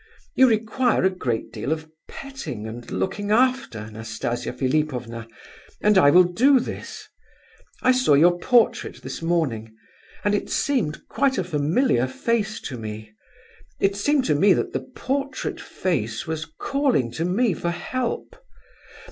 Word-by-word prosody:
You 260 -1 +6
require 225 +2 +1
a 190 - +4
great 125 -11 -3
deal 135 - -3
of 160 0 -2 0.2
petting 270 - -7
and 115 +2 -8
looking 205 +2 -2
after, 220 - +1
Nastasia 110 +2 -4
Philipovna, 125 -5 -2 0.5
and 210 0 +3
I 165 -7 +7
will 180 +5 +7
do 250 +10 +4
this. 245 - -7 0.8
I 255 - +6
saw 255 - +4
your 175 +4 +5
portrait 240 +4 +2
this - - -6
morning, 135 -11 -1 0.5
and 205 - +2
it 205 - -1
seemed 240 - -1
quite 275 -1 +1
a 190 - +1
familiar 155 - +1
face 225 - -1
to 125 -4 -6
me; 110 0 -7 0.7
it 195 0 +2
seemed 275 +6 +1
to 150 - +2
me 190 +7 +5
that - - -2
the - - -4
portrait 275 +1 -3
face 115 - -2
was 160 0 -3
calling 270 - +1
to 160 - -3
me 195 +5 +2
for 170 - -3
help. 245 +8 -3
175 Hz, 145 wpm, -23 LUFS, -, 0.8 s, I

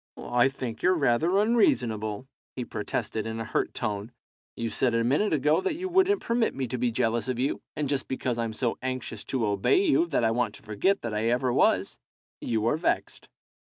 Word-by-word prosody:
"I 120 +1 +2
think 125 -4 -5
you're 185 +1 +4
rather 160 +5 +2
unreasonable," 125 - +1 0.3
he 125 - -4
protested, 110 0 -3
in 110 0 -4
a - - -2
hurt 110 - -1
tone. 105 -1 -3 0.4
"You 115 -1 -3
said 120 0 +1
a 115 - +2
minute 145 - +2
ago 150 0 +2
that 380 -5 -1
you 370 +3 -4
wouldn't 380 +2 +3
permit 235 -1 +1
me 130 -1 -2
to 125 - -3
be 125 0 +2
jealous 115 +1 0
of 130 -2 -1
you, 130 +3 -1
and 150 -1 -1
just 140 -1 -1
because 125 -2 -2
I'm 115 -1 -2
so 120 +1 -1
anxious 130 -4 -4
to 130 -4 -1
obey 100 - +2
you 335 0 +3
that 120 - 0
I 110 - +3
want 115 -2 -1
to - - -15
forget 110 - 0
that 115 -2 -3
I 105 +1 -1
ever 125 +1 +1
was, - - +2 0.4
you 110 -2 -1
are 135 +6 +2
vexed." 165 - -2
125 Hz, 205 wpm, -27 LUFS, 115-150 Hz, 0.4 s, you're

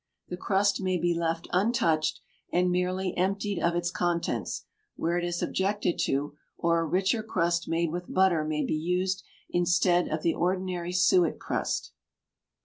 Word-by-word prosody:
The 180 - -3
crust 200 +2 +1
may 185 -1 +1
he 175 +1 +2
left 165 0 -2
untouched 180 -6 +1 0.3
and 180 +1 +2
merely 180 +1 -1
emptied 200 +1 -1
of 170 0 +1
its 175 0 0
contents, 170 - -1 0.3
where 170 +1 -1
it - - -4
is 175 0 -2
objected 195 -2 0
to, 145 +2 -1 0.2
or 170 0 +2
a 165 - 0
richer 195 +7 +1
crust 170 -5 0
made 165 0 0
with 175 +1 -5
butter 185 -4 +3
may 155 0 -1
be - - -1
used 180 +4 0 0.3
instead 175 0 +3
of 155 0 -3
the 165 - +2
ordinary 180 -1 -1
suet 345 - +3
crust. - - -2
175 Hz, 155 wpm, -28 LUFS, 170-190 Hz, 0.3 s, butter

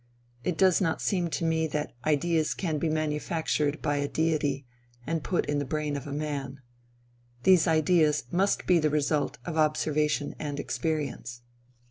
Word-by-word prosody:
It 180 -3 -1
does 190 0 +4
not 165 -4 +1
seem 180 -4 0
to 165 - -2
me 160 0 +1
that 150 -1 -3
ideas 155 +1 +1
can 160 -5 -2
be 160 - 0
manufactured 155 -1 -1
by 145 0 +1
a 145 0 0
deity 150 -4 0 0.4
and 165 +1 -2
put 180 - 0
in 145 0 0
the - - -1
brain 150 +1 -2
of 140 0 -5
man. 140 -2 -4 0.8
These 185 -1 +5
ideas 155 -2 +3
must 195 +3 +1
be 180 -2 +4
the 155 -1 +2
result 150 0 0
of 165 -2 -4
observation 150 -1 +1
and 145 -1 -4
experience. 140 -8 -3
155 Hz, 155 wpm, -28 LUFS, 145-165 Hz, 0.8 s, These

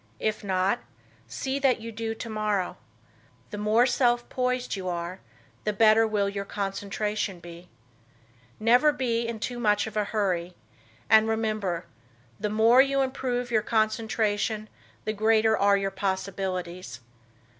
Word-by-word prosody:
If 215 0 -1
not, 190 +4 +1 0.5
see 265 - -3
that 265 -4 +3
you 230 +1 -7
do 225 0 -4
tomorrow. 215 -4 -2 0.8
The 210 - -5
more 215 +3 +4
self 240 -1 +2
poised 250 -1 -1
you 185 -2 -4
are 175 +1 -4 0.4
the 210 - 0
better 220 +2 +5
will 205 -2 +1
your 200 0 -3
concentration 200 0 -3
be. 170 +1 -12 0.9
Never 245 +7 +5
be 235 -4 -1
in 230 -1 -4
too 245 +2 -4
much 210 -3 +2
of 220 -1 -8
a 210 -1 +1
hurry; 180 -5 -1 0.5
and, 220 0 +6
remember, 215 -6 -1 0.5
the 210 - -1
more 225 +4 +6
you 275 0 +2
improve 250 -2 -2
your 220 -2 +3
concentration, 215 -1 0 0.4
the 215 - -1
greater 220 +1 +3
are 200 -1 +4
your 195 0 -1
possibilities. 185 -7 -3
215 Hz, 135 wpm, -27 LUFS, 195-230 Hz, 0.9 s, and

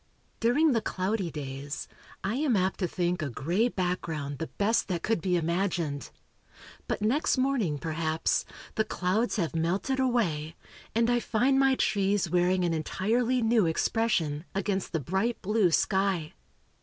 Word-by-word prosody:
During 285 +7 +3
the 230 -3 +2
cloudy 190 -1 -1
days, 140 -1 -6 0.4
I 195 +3 -1
am 280 -5 +2
apt 190 0 0
to 185 - +1
think 175 0 -1
a 150 - -2
gray 170 - +1
background 165 - -3
the 160 - -3
best 215 +3 0
that 180 -3 -2
could 225 -6 0
be 180 +1 +1
imagined. 170 -5 -1 0.8
But - - -2
next 260 +7 +2
morning, 255 - +1
perhaps, 160 +1 0 0.3
the 220 - +1
clouds 210 +5 0
have 170 -6 -1
melted 185 +11 0
away, 175 - 0 0.4
and 230 0 +3
I 240 0 +3
find 255 +4 +2
my 270 -1 +4
trees 200 -4 +1
wearing 180 +1 +2
an 170 - +1
entirely 230 +10 0
new 225 -5 +3
expression, 160 -4 0
against 195 -1 -1
the 160 - 0
bright 190 - -1
blue 210 -1 +3
sky. 190 -2 +1
190 Hz, 150 wpm, -28 LUFS, 165-225 Hz, 0.8 s, my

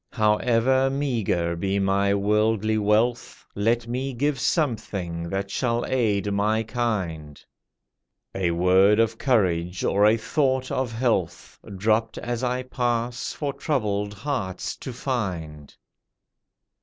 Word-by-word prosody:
However 115 +5 +2
meagre 115 -12 -1
be 95 +3 -1
my 100 0 +2
worldly 105 +1 +1
wealth, 110 +4 0
Let 115 +3 +1
me 130 +3 -3
give 140 +2 0
something 100 - -1
that 95 +1 -3
shall 120 +1 0
aid 105 -5 0
my 105 +2 +1
kind— 95 - -3 0.9
A 95 -3 0
word 95 +5 +4
of 115 0 +1
courage, 90 - +1
or 100 +1 +3
a 110 +2 +4
thought 130 +2 0
of 130 -2 -1
health, 110 -7 -2 0.2
Dropped 110 +3 +1
as 120 0 -3
I 125 0 -1
pass 120 -1 -2
for 145 -2 -3
troubled 105 -9 -2
hearts 110 -5 -3
to 130 - -7
find. 90 - -4
110 Hz, 120 wpm, -24 LUFS, 95-125 Hz, 0.9 s, word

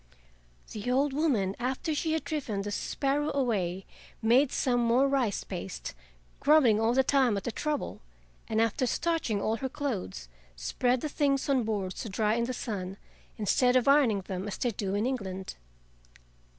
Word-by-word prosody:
The 215 +3 -4
old 270 +2 +2
woman, 245 -11 +1
after 260 +6 -1
she 315 +1 0
had 320 - -1
driven 245 -11 -3
the 205 - -4
sparrow 280 +7 -1
away, 195 -9 0 0.3
made 250 +5 +4
some 245 -2 +1
more 240 +3 +3
rice 260 -7 0
paste, 185 0 -6 0.5
grumbling 280 -8 +5
all 225 +2 +2
the 265 - +5
time 260 -6 +3
at 195 - -4
the 240 - -2
trouble, 300 +4 -3 0.5
and 220 - 0
after 230 +3 +1
starching 325 -9 0
all 220 +3 0
her 265 +3 -3
clothes, 245 - -4 0.3
spread 245 - 0
the - - -1
things 280 -2 0
on 260 -4 +2
boards 200 -4 -2
to 225 - -5
dry 210 +2 +1
in 235 +1 +1
the 255 - -3
sun, 195 -6 -4 0.4
instead 250 +4 +2
of 255 0 +3
ironing 270 -8 +4
them 190 +1 -5
as 205 - -4
they 245 - 0
do 200 -2 -3
in 210 +3 0
England. 190 -8 -3
240 Hz, 170 wpm, -29 LUFS, 205-275 Hz, 0.5 s, grumbling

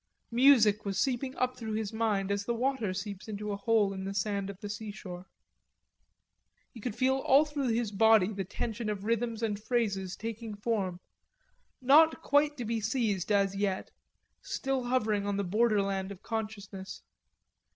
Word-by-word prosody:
Music 235 -4 +5
was 195 -2 -3
seeping 260 +4 0
up 255 0 0
through 225 -3 -5
his 215 -1 -2
mind 210 -3 0
as 200 0 0
the 235 +3 -1
water 250 -4 0
seeps 190 +1 -6
into 210 -1 -4
a - - -1
hole 210 -1 +2
dug 195 - -5
in - - -5
the 195 0 -4
sand 200 0 -1
of 200 - -7
the 205 - -6
seashore. 200 -3 -7 1.4
He 235 - -12
could 220 -1 -4
feel 265 +1 +2
all 270 +2 +4
through 295 -3 -2
his 230 -2 0
body 215 -1 +4
the 195 -1 -3
tension 220 +3 -4
of 205 -2 -3
rhythms 230 +1 -1
and 210 -2 -1
phrases 200 -6 -1
taking 225 0 -6
form, 205 -4 -2 0.8
not 315 +5 +5
quite 290 +1 +3
to 245 - -4
be 225 0 -1
seized 215 -4 0
as 200 -1 +2
yet, 195 -1 -2 0.5
still 270 -2 -2
hovering 215 -5 +1
on 200 -1 -1
the 200 - 0
borderland 200 -1 +1
of 195 -1 -10
consciousness. 205 -4 -5
215 Hz, 170 wpm, -30 LUFS, 200-235 Hz, 1.4 s, Music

